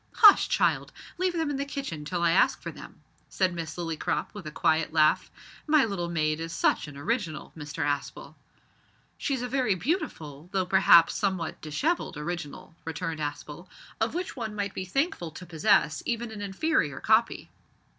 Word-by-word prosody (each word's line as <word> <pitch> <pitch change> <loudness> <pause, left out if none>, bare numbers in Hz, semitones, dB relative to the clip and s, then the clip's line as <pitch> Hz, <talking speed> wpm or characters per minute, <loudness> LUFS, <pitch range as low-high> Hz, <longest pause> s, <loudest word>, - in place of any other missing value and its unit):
"Hush, 420 -3 +8
child; - - +1 0.3
leave 370 -1 +1
them 325 -3 -1
in 280 - -2
the 280 - -1
kitchen 275 - -5
till 175 +2 -2
I 170 - +4
ask 180 - +3
for - - -6
them," - - -13 0.3
said 185 -2 +1
Miss 165 -2 -5
Lillycrop 165 -3 -2
with 205 -6 -8
a - - -5
quiet 160 0 +1
laugh. 155 -1 +3 0.4
"My 300 -2 +5
little 185 -5 -3
maid 155 -2 0
is 165 +1 -5
such 170 - +1
an 145 -2 -10
original, 180 - -3
Mr 150 -1 -4
Aspel." 145 -1 -3 0.9
"She's 265 -3 -1
a - - -2
very 250 -6 +1
beautiful, 180 - -3
though 190 -1 +1
perhaps 175 -3 +6
somewhat 190 -6 -2
dishevelled, 175 - -1
original," 165 0 -6
returned 160 0 -4
Aspel, 150 +3 -6 0.3
"of 220 +7 0
which 360 +1 -3
one 220 -5 -5
might 200 -1 -2
be 185 - -4
thankful 190 - -1
to 180 - -9
possess 180 +4 +2
even 235 -1 -2
an 215 -2 -7
inferior 200 - 0
copy." 225 +1 +2
180 Hz, 170 wpm, -27 LUFS, 160-235 Hz, 0.9 s, Hush